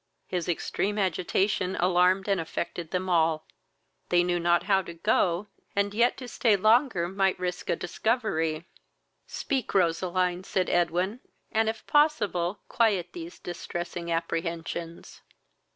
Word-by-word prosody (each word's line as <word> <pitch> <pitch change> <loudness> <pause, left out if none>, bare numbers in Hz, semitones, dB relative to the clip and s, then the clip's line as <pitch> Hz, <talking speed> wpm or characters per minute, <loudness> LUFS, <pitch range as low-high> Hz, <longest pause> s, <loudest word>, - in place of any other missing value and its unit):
His 180 -2 -3
extreme 200 +4 -1
agitation 190 0 0
alarmed 180 +2 +3
and 195 -3 +1
affected 165 0 -4
them 185 +2 -2
all. 160 -3 +2 0.6
They 175 0 +4
knew 175 0 0
not 175 0 +3
how 195 -2 +3
to 170 -2 -9
go, 180 0 +1 0.3
and 200 0 +1
yet 235 +3 +3
to 255 - -7
stay 230 -3 +2
longer 215 -2 +3
might 190 +1 +1
risk 180 -1 -4
a - - +3
discovery. 175 -6 -1 0.6
"Speak, 270 -7 -3
Roseline, 180 0 +1
(said 185 -1 -1
Edwin,) 180 +6 +1 0.3
and 220 0 +2
if 220 0 -5
possible 210 - +2
quiet 205 -7 +2
these 170 0 -8
distressing 175 0 -5
apprehensions." 165 0 -4
180 Hz, 130 wpm, -27 LUFS, 170-205 Hz, 0.6 s, They